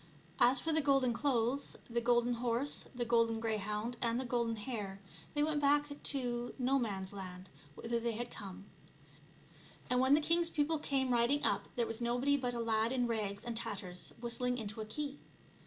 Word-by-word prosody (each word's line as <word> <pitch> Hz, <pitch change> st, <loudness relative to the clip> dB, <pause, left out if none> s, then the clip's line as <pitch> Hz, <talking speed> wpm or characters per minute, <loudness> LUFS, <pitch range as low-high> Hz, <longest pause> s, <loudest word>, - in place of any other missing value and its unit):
As 250 Hz, +2 st, +6 dB
for 325 Hz, +3 st, 0 dB
the 315 Hz, -, +3 dB
golden 275 Hz, -4 st, +3 dB
clothes, 255 Hz, 0 st, 0 dB
the 235 Hz, 0 st, -1 dB
golden 240 Hz, 0 st, +3 dB
horse, 240 Hz, +4 st, 0 dB
the 245 Hz, -1 st, -1 dB
golden 230 Hz, -1 st, +3 dB
greyhound, 215 Hz, +1 st, -2 dB
and 235 Hz, 0 st, +1 dB
the 260 Hz, -, -3 dB
golden 235 Hz, -2 st, 0 dB
hare, 205 Hz, -4 st, -5 dB, 0.4 s
they 295 Hz, -, +3 dB
went 300 Hz, -1 st, +1 dB
back 290 Hz, +1 st, +3 dB
to 245 Hz, -3 st, 0 dB
Nomans 235 Hz, -8 st, 0 dB
land 185 Hz, -1 st, -7 dB, 0.3 s
whither 235 Hz, +5 st, -2 dB
they 230 Hz, 0 st, -1 dB
had 240 Hz, +2 st, -4 dB
come; 195 Hz, -1 st, -7 dB, 1.3 s
and 250 Hz, -, +3 dB
when 260 Hz, +2 st, +6 dB
the -, -, +4 dB
king's 335 Hz, +2 st, +2 dB
people 310 Hz, 0 st, +1 dB
came 270 Hz, -3 st, +1 dB
riding 240 Hz, +5 st, +3 dB
up -, -, +1 dB
there 240 Hz, -, +1 dB
was 225 Hz, +1 st, -2 dB
nobody 245 Hz, +4 st, +2 dB
but 250 Hz, -3 st, -1 dB
a -, -, -2 dB
lad 225 Hz, 0 st, +2 dB
in 250 Hz, -2 st, +1 dB
rags 210 Hz, -3 st, -2 dB
and 235 Hz, -1 st, -3 dB
tatters 200 Hz, -6 st, -3 dB
whistling 245 Hz, +1 st, -1 dB
into 220 Hz, -1 st, -4 dB
a -, -, -4 dB
key. 290 Hz, +4 st, -4 dB
240 Hz, 180 wpm, -35 LUFS, 225-270 Hz, 1.3 s, As